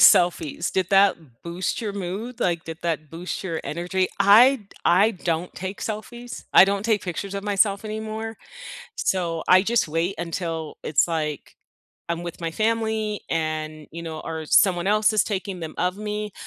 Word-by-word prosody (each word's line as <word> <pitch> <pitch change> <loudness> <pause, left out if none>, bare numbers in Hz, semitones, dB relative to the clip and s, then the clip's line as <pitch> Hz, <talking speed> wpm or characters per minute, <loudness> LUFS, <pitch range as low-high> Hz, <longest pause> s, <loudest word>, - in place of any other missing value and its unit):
selfies? 170 -2 +4
Did 185 -2 0
that 195 0 +5 0.3
boost 175 +6 -3
your 215 -3 -3
mood? 200 +6 -5
Like, 170 -5 0
did 165 -1 -7
that 155 -3 -2
boost 170 +2 -5
your 165 -4 -2
energy? 180 +3 -1
I 220 +7 +7
d 210 -6 -17 0.2
I 195 +5 +5
don't 175 -2 -3
take 190 +2 -6
selfies. 235 +3 -6
I - - +9
don't 200 0 -1
take 220 -2 +2
pictures 190 +2 -4
of 200 0 -4
myself 200 0 +2
anymore. 220 +1 -5 0.6
So 175 - -1
I 185 +1 +7
just 230 +1 +2
wait 165 +5 0
until 165 -2 -4
it's, 145 -1 +2
like, 155 -4 -3 0.5
I'm 170 0 -2
with 170 0 -7
my 165 -1 -2
family 220 +1 0
and, 155 -1 -2
you 170 +1 -6
know, 160 -2 -6
or 160 -1 -4
someone 175 +2 +4
else 215 +2 +3
is 215 - +4
taking 190 -3 -4
them 160 -1 -6
of 180 +1 0
me. 210 0 -4
185 Hz, 170 wpm, -24 LUFS, 165-210 Hz, 0.6 s, I